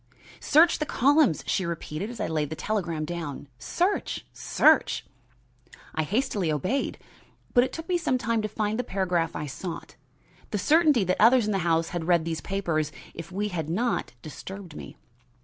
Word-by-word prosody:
"Search 325 +3 +4
the 305 - 0
columns," 280 - +3
she 195 - 0
repeated, 170 +2 -4
as 240 - -8
I - - 0
laid 155 -3 -1
the 160 - -4
telegram 170 -5 -2
down. 160 -4 -5
"Search! 360 - -1
Search!" - - +3 0.9
I 160 - 0
hastily 200 - 0
obeyed. 185 - -1 0.6
But 245 0 +6
it - - -6
took 325 0 -7
me 360 -2 +1
some 255 -6 +1
time 230 -1 0
to 215 - -2
find 215 +1 -2
the - - +1
paragraph 180 -6 -1
I 150 - -3
sought. 165 +5 -7 0.5
The 210 - -1
certainty 300 - +4
that 185 +1 0
others 235 +1 +6
in 215 - 0
the 195 - +1
house 165 -1 +1
had 170 -2 -4
read 170 -3 +3
these 160 -2 -3
papers, 165 -6 -1 0.2
if 165 +1 -8
we 205 +3 -2
had 160 -5 -3
not, 225 - -1
disturbed 185 +2 -9
me. - - -9
190 Hz, 175 wpm, -26 LUFS, 165-235 Hz, 0.9 s, But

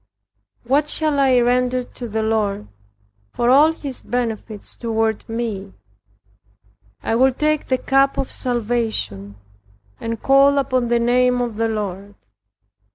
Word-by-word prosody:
"What 280 +5 +1
shall 300 -2 0
I 260 -2 +4
render 250 +1 +1
to 245 0 -9
the 220 +1 -2
Lord, 210 - -1 0.7
for 240 +1 +1
all 295 +4 +6
his 280 -5 -7
benefits 225 -3 -4
toward 225 -2 -1
me? 220 -4 -4 1.3
I - - -1
will 260 +3 +4
take 305 +1 0
the 260 - +1
cup 275 +1 +2
of 265 - -2
salvation, 225 - -2 0.6
and 230 -1 -4
call 275 +1 +4
upon 255 -3 0
the 240 0 +2
name 250 +1 +2
of 240 -3 -2
the 225 0 +1
Lord." 205 -2 -5
240 Hz, 130 wpm, -20 LUFS, 220-265 Hz, 1.3 s, all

